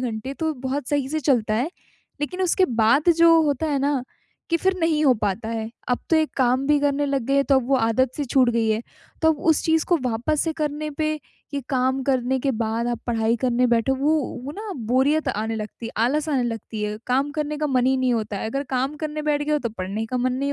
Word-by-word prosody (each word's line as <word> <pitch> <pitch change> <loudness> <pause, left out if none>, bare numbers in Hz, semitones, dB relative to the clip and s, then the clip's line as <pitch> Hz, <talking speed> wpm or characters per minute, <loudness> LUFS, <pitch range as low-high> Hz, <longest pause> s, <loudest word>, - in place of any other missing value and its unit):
घंटे 250 +2 -4
तो 320 -1 0
बहुत 270 0 -2
सही 285 -2 0
से 310 +1 -2
चलता 235 -6 +1
है, 245 +6 +1 0.5
लेक़िन 360 +6 -2
उसके 370 +1 +3 0.2
बाद 280 +10 +4
जो 330 -1 +7
होता 295 +1 0
है 280 - +1
ना 275 -2 0 0.5
कि 335 - +4
फिर 380 +3 +1
नहीं 315 -2 +2
हो 265 - +6
पाता 210 +2 -1
है। 225 -1 -3 0.2
अब 250 - +1
तो 325 - +5
एक 315 -1 +1
काम 260 +1 +2
भी 295 0 +4
करने 290 0 +1
लग 275 -2 0
गए 275 - +1
हैं, 275 - +3
तो 275 - +3
अब 250 0 -5
वो 270 - +4
आदत 240 +2 +1
सी 290 - -1
छूट 255 -1 +3
गई 230 -1 +1
है, 220 +2 0 0.4
तो 320 - +5
अब 295 - -8
उस 315 - +2
चीज़ 320 -1 +2
को 350 - +4
वापस 250 +6 0
से 325 - -1
करने 300 0 -3
पे 310 0 +1 0.4
ये 280 - -1
काम 260 0 +1
करने 260 -1 +1
के 275 - +1
बाद 225 +2 -1
आप 240 - -2
पढ़ाई 230 0 +1
करने 250 0 +2
बैठो, 235 +2 +2
वो 290 +4 +2 0.3
वो 285 - -5
ना 425 -1 -5
बोरियत 275 +5 +2
आने 220 -1 -2
लगती 215 +2 -6
है, - - -8
आलस 300 +5 0
आने 270 -5 +1
लगती 225 -2 -4
है, 210 0 -2
काम 270 +3 +1
करने 300 0 -3
का 305 - 0
मन 255 -2 +2
ही 265 0 +3
नहीं 255 -1 +1
होता 215 -2 -2
है, 210 - -3
अगर 275 +4 -2
काम 265 +3 0
करने 305 0 -4
बैठ 295 -1 +1
गए 300 +1 -1
हो 300 - +3
तो 235 - -3
पढ़ने 200 +4 -3
का 255 - -3
मन 250 +1 +1
नहीं 280 +2 -1
265 Hz, 250 wpm, -23 LUFS, 235-300 Hz, 0.5 s, जो